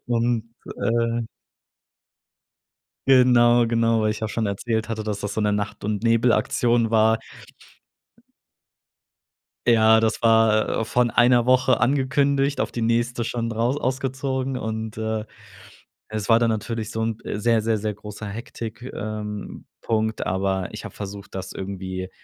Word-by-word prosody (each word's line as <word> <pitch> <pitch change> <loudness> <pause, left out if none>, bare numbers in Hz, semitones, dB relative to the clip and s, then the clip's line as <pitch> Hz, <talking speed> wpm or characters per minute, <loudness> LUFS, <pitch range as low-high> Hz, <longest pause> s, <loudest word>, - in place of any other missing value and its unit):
Und, 120 -1 0 0.4
äh 115 0 0 1.8
Genau, 120 -2 +5
genau, 115 -1 +2
weil 110 - +2
ich 105 - -4
ja 110 - -1
auch - - -5
schon 115 +1 -2
erzählt 110 +2 -2
hatte, 110 -1 -3
dass 105 -1 -3
das 100 -1 -4
so - - -2
'ne 105 -1 +1
Nacht 105 0 -3
und 105 0 -2
Nebel 115 +1 +3
Aktion 115 -1 +1
war. 110 0 +4 2.5
Ja, 110 -1 +5
das 110 +1 0
war, 110 -2 +3
äh, 115 - 0
von 120 +1 +1
1 120 0 +4
Woche 130 0 +3
angekündigt, 140 +2 +1
auf - - -1
die 120 - -4
nächste 120 +1 0
schon 115 -1 -3
raus 115 +5 0
ausgezogen 130 0 -2
und, 110 -1 -4
äh, 110 -1 -2 0.9
es 110 -2 -4
war 115 - +7
dann 115 - +2
natürlich 110 0 -3
so 110 -1 -3
'n 110 -1 -2
p 105 - -5
sehr, 115 +1 +2
sehr, 110 0 +1
sehr 105 +1 -2
großer, 105 +1 -9
Hektik 115 +2 -7
ähm, 105 -1 -6 0.2
Punkt, 110 -1 -1
aber 95 0 -1
ich - - -8
hab - - -8
versucht, 100 -1 -8
das 95 0 -5
irgendwie 95 -1 -5
115 Hz, 150 wpm, -23 LUFS, 110-120 Hz, 2.5 s, war